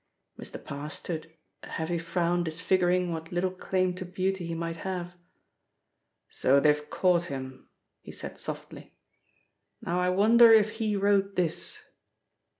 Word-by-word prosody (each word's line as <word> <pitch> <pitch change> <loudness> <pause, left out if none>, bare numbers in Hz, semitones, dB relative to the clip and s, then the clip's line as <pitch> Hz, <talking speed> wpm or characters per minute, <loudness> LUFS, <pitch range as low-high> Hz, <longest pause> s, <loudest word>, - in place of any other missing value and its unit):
Mr. - - -7
Parr 140 +2 -6
stood, 160 0 -6 0.3
a - - -11
heavy 170 +1 -2
frown 170 +1 0
disfiguring 175 +2 +1
what 160 0 -6
little 180 +1 0
claim 185 0 -1
to 185 - -6
beauty 185 0 -2
he 165 - -3
might 165 0 -4
have. 180 -1 -4 1.1
"So 135 +2 +3
they've 150 +1 +2
caught 180 -2 +2
him," 130 -3 -7 0.3
he - - -11
said - - -7
softly. - - -8 0.8
"Now 175 +1 -2
I 180 0 +2
wonder 225 +5 +6
if 215 -1 +6
he 215 -2 -1
wrote 200 0 +2
this?" 175 -3 -1
175 Hz, 140 wpm, -28 LUFS, 165-190 Hz, 1.1 s, wonder